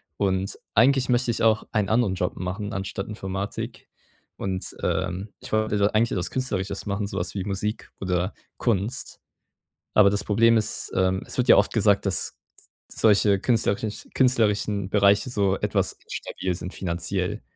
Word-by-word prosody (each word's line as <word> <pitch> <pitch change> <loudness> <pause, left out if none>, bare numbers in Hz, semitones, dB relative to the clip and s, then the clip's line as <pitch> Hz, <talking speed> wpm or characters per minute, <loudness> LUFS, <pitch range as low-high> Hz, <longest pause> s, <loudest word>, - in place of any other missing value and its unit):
Und 95 -1 -1 0.2
eigentlich 130 +3 +4
möchte 120 -1 +2
ich 110 - -2
auch 110 -1 +3
einen 105 -3 +1
anderen 110 -4 +2
Job 90 -1 -2
machen, 95 +4 -4
anstatt 100 -1 -4
Informatik. 100 -1 -5 0.5
Und, 95 -1 -3
ähm, 95 +2 -1
ich - - -9
wollte 105 -1 +1
eigentlich 110 +2 +2
etwas 90 -1 -2
Künstlerisches 100 -7 -2
machen, 100 0 -2
sowas 90 -1 -4
wie 95 - -2
Musik 105 +2 -3
oder 90 0 -1 0.2
Kunst. 115 +2 -1 0.7
Aber 105 -2 +6
das 100 - -1
Problem 115 +2 +4
ist, 110 - -1
ähm, 95 0 +2
es - - -5
wird 125 0 0
ja - - +9
oft 100 - +3
gesagt, 100 -2 +3
dass 95 - -1 0.5
solche 105 -2 +3
künstlerische 110 -2 0
künstlerischen 105 -6 +2
Bereiche 100 +2 +4
so 100 -4 +1
etwas - - -1
instabil 90 -1 -3
sind 90 +1 -6
finanziell. 90 +1 -2
100 Hz, 150 wpm, -25 LUFS, 95-110 Hz, 0.7 s, ja